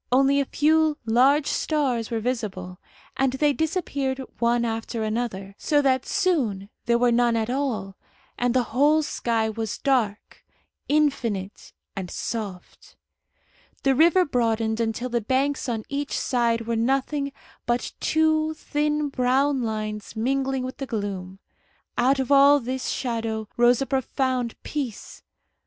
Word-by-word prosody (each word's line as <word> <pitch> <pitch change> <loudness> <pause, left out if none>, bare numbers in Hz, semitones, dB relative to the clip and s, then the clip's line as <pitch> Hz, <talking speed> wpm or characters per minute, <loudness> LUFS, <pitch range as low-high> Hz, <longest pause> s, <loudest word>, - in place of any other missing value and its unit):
Only 275 +2 +4
a 280 - +1
few 310 +2 +2
large 265 +6 +4
stars 265 -10 0
were 230 -2 -1
visible, 205 -7 -4 0.4
and 265 -1 +2
they 290 +2 +2
disappeared 285 -5 -1 0.2
one 235 0 +2
after 225 0 -3
another, 215 -3 -3
so 295 -2 +2
that 260 -1 +2
soon 245 - 0 0.2
there 235 0 +4
were 245 0 +3
none 240 0 +3
at 225 +1 -1
all, 230 -8 -2 0.4
and 245 0 0
the 255 - +4
whole 295 +5 +4
sky 230 -6 -1
was 220 -1 -3
dark, 235 -7 -1 0.5
infinite, 235 -10 0 0.2
and 190 -3 -5
soft. 200 -5 -6 0.9
The 270 - +4
river 340 +6 +5
broadened 225 -4 0
until 230 +2 -1
the 235 -1 0
banks 265 +4 0
on 225 -2 -2
each 280 0 -3
side 235 -2 +1
were 230 0 -2
nothing 275 +4 0 0.4
but 240 0 -1
two 315 0 +2
thin 300 -1 -1
brown 265 +1 +1
lines 215 -2 -4
mingling 265 +3 0
with 255 0 -6
the 270 - -5
gloom. 195 -4 -4 0.6
Out 260 +3 +3
of 265 +1 -2
all 280 +1 +7
this 255 +1 -4
shadow 225 -3 -2
rose 240 +2 +4
a - - -4
profound 260 -2 -1
peace. 270 -8 -5
250 Hz, 140 wpm, -24 LUFS, 225-280 Hz, 0.9 s, all